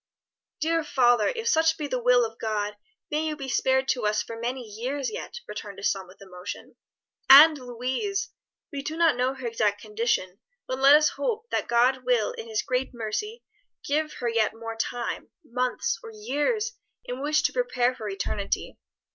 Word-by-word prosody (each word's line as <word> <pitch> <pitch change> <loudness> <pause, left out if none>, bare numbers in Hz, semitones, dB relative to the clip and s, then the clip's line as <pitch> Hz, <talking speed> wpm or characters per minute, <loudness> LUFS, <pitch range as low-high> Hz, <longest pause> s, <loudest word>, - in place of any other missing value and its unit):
"Dear 330 0 +1
father, 245 -5 +3
if 455 -1 -4
such 320 -5 +3
be 305 - -3
the 255 -3 -2
will 245 0 +5
of 225 0 -8
God, 210 -2 -2 0.4
may 305 +1 0
you 310 -1 -2
be 275 -2 -7
spared 265 +1 +2
to 245 -5 +1
us 210 0 +1
for 230 - -8
many 245 +3 -3
years 255 - -3
yet," 475 +1 -6
returned 205 -2 -7
his 195 - +1
son 190 -2 -5
with 185 - -17
emotion. 180 +1 -8 0.5
"And 300 +4 +10
Louise! 255 - -3 0.4
We 280 -2 -4
do 310 +3 -5
not 330 -4 +4
know 255 +2 0
her 260 -2 -8
exact 215 -3 0
condition, 210 -3 -1 0.3
but 260 0 -4
let 275 +2 +8
us 305 0 +5
hope 465 -1 -3
that - - -1
God 250 +2 +3
will 245 -3 +2
in 225 - -8
His 220 -1 -1
great 255 0 -2
mercy 420 - -4 0.4
give 305 +2 0
her 245 - -4
yet 225 -2 +1
more 225 0 -6
time 235 +1 -3 0.2
months 250 - -1
or 455 - -9
years 430 - -1 0.3
in 250 +2 -5
which 305 +1 +2
to - - +1
prepare 255 - +1
for 220 -4 -6
eternity. 200 0 -3
255 Hz, 180 wpm, -26 LUFS, 225-305 Hz, 0.5 s, And